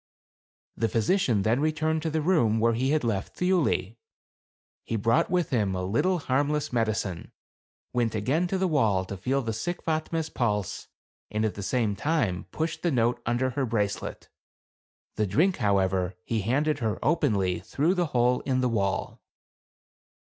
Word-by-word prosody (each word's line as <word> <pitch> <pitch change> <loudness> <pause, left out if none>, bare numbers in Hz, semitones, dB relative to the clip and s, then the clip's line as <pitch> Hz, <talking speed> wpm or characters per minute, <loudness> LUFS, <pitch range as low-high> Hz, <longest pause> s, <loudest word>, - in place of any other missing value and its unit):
The 115 - 0
physi 115 - +2
cian 110 - +1
then 115 +5 +2
returned 155 +1 0
to 160 - -1
the 155 0 -1
room 120 - +3
where 115 +1 +3
he 130 +4 0
had 155 -1 +2
left 105 -4 -2
Thiuli. 170 - +1 0.9
He 115 - -3
brought 115 +10 +2
with 180 -3 0
him 105 -7 +1
a 90 - -2
little 145 - +1
harm 145 -1 0
less 150 -3 -2
medicine, 110 -7 -1 0.6
went 120 -2 0
again 135 - +1
to 190 - -1
the 190 0 +1
wall 110 - +2
to 100 - -6
feel 130 +8 -1
the 115 -1 -2
sick 175 +11 -4
Fatme's 160 0 -1
pulse, 105 -6 -1 0.4
and 110 +1 0
at 110 - -1
the 100 - -7
same 105 0 0
time 115 - 0
pushed 160 +1 -3
the 175 - +1
note 120 -3 +1
under 125 +2 +1
her 130 +1 -1
bracelet. 105 -3 -2 0.9
The 105 -1 +1
drink, 170 - +2
how 100 -5 +2
ever, 95 -1 0
he 115 -2 -1
handed 145 +8 +1
her 110 -4 -1
openly 110 - +1
through 140 - 0
the 175 -3 0
hole 125 -2 +2
in 130 -1 0
the 125 - +2
wall. 100 -4 -1
120 Hz, 170 wpm, -27 LUFS, 105-155 Hz, 0.9 s, room